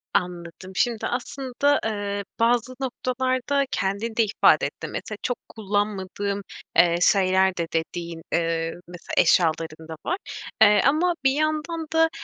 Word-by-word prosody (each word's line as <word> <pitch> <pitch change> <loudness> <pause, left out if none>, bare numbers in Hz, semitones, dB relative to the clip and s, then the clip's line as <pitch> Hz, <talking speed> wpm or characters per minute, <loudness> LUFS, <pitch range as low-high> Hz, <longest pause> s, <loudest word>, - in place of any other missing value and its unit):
Anladım. 180 +1 -3
Şimdi 235 +1 0
aslında, 265 +3 0
eee, 205 -2 -2 0.2
bazı 240 +2 +2
noktalarda 255 +1 -1
kendin 200 +4 -2
de 230 - +4
ifade 205 - +4
ettin. - - -6
Mesela 215 -2 -5
çok 245 - -1
kullanmadığın, 200 -1 -2 0.3
eee, 170 -1 +6
şeyler 190 -1 +3
de 170 -1 -1
dediğin, 165 0 -3
eee, 165 -1 0
mesela 175 -1 -10
eşyaların 160 -2 +2
da 160 - -6
var. 360 - 0 0.4
Eee, 210 -2 +7
ama 320 +6 +3
bir 265 - +5
yandan 310 +2 -1
da, 325 0 +4
205 Hz, 130 wpm, -24 LUFS, 180-255 Hz, 0.4 s, Eee